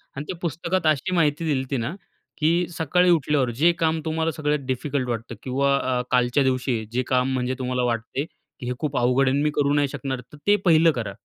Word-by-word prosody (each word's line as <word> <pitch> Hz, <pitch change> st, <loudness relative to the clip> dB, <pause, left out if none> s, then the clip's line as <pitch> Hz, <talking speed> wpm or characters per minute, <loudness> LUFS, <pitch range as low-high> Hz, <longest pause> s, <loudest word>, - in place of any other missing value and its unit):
आणि 140 Hz, -, -5 dB
ते -, -, -1 dB
पुस्तकात 170 Hz, +1 st, -1 dB
अशी 155 Hz, +5 st, +1 dB
माहिती 160 Hz, 0 st, +1 dB
दिला 145 Hz, -4 st, +1 dB
होती 135 Hz, 0 st, -3 dB
ना 115 Hz, +8 st, -3 dB, 0.5 s
की 170 Hz, +3 st, +2 dB
सकाळी 175 Hz, +2 st, +2 dB
उठल्यावर 150 Hz, -5 st, +2 dB
जे 170 Hz, +2 st, +6 dB
काम 160 Hz, 0 st, +1 dB
तुम्हाला 160 Hz, 0 st, 0 dB
सगळ्यात 150 Hz, -1 st, -1 dB
डिफिकल्ट 130 Hz, 0 st, -2 dB
वाटतं 115 Hz, 0 st, -4 dB
किंवा 140 Hz, +2 st, +1 dB
अ, 125 Hz, -2 st, 0 dB
कालच्या 125 Hz, +2 st, +3 dB
दिवशी 130 Hz, -3 st, 0 dB
जे 125 Hz, +2 st, 0 dB
काम, 130 Hz, 0 st, +1 dB
म्हणजे 130 Hz, 0 st, -1 dB
तुम्हाला 125 Hz, -1 st, -1 dB
वाटते 120 Hz, +4 st, -2 dB, 0.3 s
की 125 Hz, -, -7 dB
हे 125 Hz, -, -1 dB
खूप 150 Hz, -3 st, -2 dB
अवघड 125 Hz, +2 st, +3 dB
आहे 130 Hz, -, +2 dB
अन् 145 Hz, -, +1 dB
मी 150 Hz, -, +2 dB
करू 145 Hz, 0 st, +2 dB
नाही 145 Hz, -1 st, +2 dB
शकणार, 130 Hz, -1 st, -4 dB
तर 150 Hz, -, -12 dB
ते 205 Hz, -, +6 dB
पहिलं 165 Hz, -1 st, +6 dB
करा. 110 Hz, -7 st, -4 dB
140 Hz, 215 wpm, -24 LUFS, 125-160 Hz, 0.5 s, जे